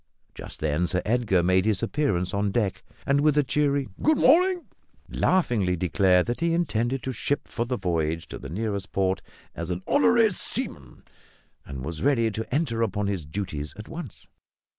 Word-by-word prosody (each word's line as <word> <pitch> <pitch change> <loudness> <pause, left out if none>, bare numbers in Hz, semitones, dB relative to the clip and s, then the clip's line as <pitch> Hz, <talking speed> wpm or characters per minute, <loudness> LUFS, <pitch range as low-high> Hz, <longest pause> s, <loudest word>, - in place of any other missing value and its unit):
Just - - -8
then 80 +3 +1
Sir 90 +1 -1
Edgar 105 -6 +2
made 95 +1 +3
his 105 -4 +1
appearance 100 -12 0
on 100 +1 +1
deck, 105 -3 -1 0.2
and, 140 +1 +2
with 150 0 +3
a 150 - +5
cheery 140 0 +1
"good 310 0 +4
morning," 360 +6 +4 0.4
laughingly 120 - +1
declared 90 +1 +3
that 120 - -3
he 165 0 +1
intended 130 -6 0
to 130 - -2
ship 140 +4 -2
for 115 - -2
the 125 0 -1
voyage 85 -4 -1
to - - -7
the 70 - -8
nearest 100 +2 -3
port 95 -1 0 0.3
as 85 +2 -5
an 90 +1 -3
"honorary 230 -5 +4
seaman," 175 - -4 0.6
and 65 -2 -6
was 80 0 -5
ready 120 -5 +2
to 110 +2 -5
enter 125 -5 0
upon 105 -2 0
his 95 -6 -2
duties 75 -4 -5
at 105 - -9
once. 160 - -8
110 Hz, 175 wpm, -26 LUFS, 90-145 Hz, 0.6 s, a